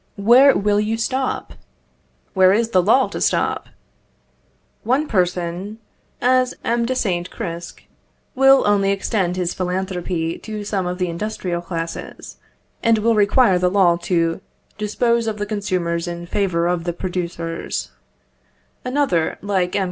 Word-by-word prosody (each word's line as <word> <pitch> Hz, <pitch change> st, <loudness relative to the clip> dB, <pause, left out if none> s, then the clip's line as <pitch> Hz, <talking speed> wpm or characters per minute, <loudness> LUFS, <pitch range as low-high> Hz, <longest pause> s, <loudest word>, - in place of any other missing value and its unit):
Where 245 Hz, +7 st, +6 dB
will 205 Hz, +1 st, +2 dB
you 215 Hz, +2 st, -1 dB
stop? 260 Hz, +3 st, -2 dB, 0.8 s
Where 185 Hz, -1 st, +5 dB
is 225 Hz, +2 st, +1 dB
the 185 Hz, -, +4 dB
law 230 Hz, +8 st, +4 dB
to -, -, -6 dB
stop? -, -, 0 dB, 1.2 s
One 265 Hz, +7 st, +1 dB
person, 180 Hz, 0 st, -1 dB, 0.4 s
as 255 Hz, 0 st, +2 dB
M. 235 Hz, 0 st, 0 dB
de 260 Hz, -, -1 dB
Saint 180 Hz, -7 st, -1 dB
Cricq, 170 Hz, 0 st, -7 dB, 0.5 s
will 270 Hz, +1 st, +5 dB
only 200 Hz, -1 st, +3 dB
extend 195 Hz, -2 st, 0 dB
his 180 Hz, -1 st, -1 dB
philanthropy 180 Hz, -2 st, -3 dB
to 215 Hz, -1 st, -6 dB
some 200 Hz, -3 st, -2 dB
of 180 Hz, 0 st, -3 dB
the 180 Hz, -1 st, -1 dB
industrial 175 Hz, -1 st, -3 dB
classes, 165 Hz, -1 st, -6 dB, 0.4 s
and 230 Hz, -1 st, +3 dB
will 230 Hz, +2 st, +2 dB
require 205 Hz, -2 st, +4 dB
the 180 Hz, 0 st, +2 dB
law 180 Hz, -3 st, +4 dB
to 170 Hz, 0 st, 0 dB, 0.3 s
dispose 230 Hz, +2 st, 0 dB
of 215 Hz, -1 st, -2 dB
the 205 Hz, -, -2 dB
consumers 185 Hz, -5 st, -2 dB
in 170 Hz, 0 st, -5 dB
favour 175 Hz, -3 st, 0 dB
of 175 Hz, -1 st, -1 dB
the 175 Hz, -, -1 dB
producers. 170 Hz, -2 st, -4 dB, 0.9 s
Another, 250 Hz, -, 0 dB
like 190 Hz, -3 st, 0 dB
M. -, -, +2 dB
190 Hz, 140 wpm, -20 LUFS, 175-220 Hz, 1.2 s, Where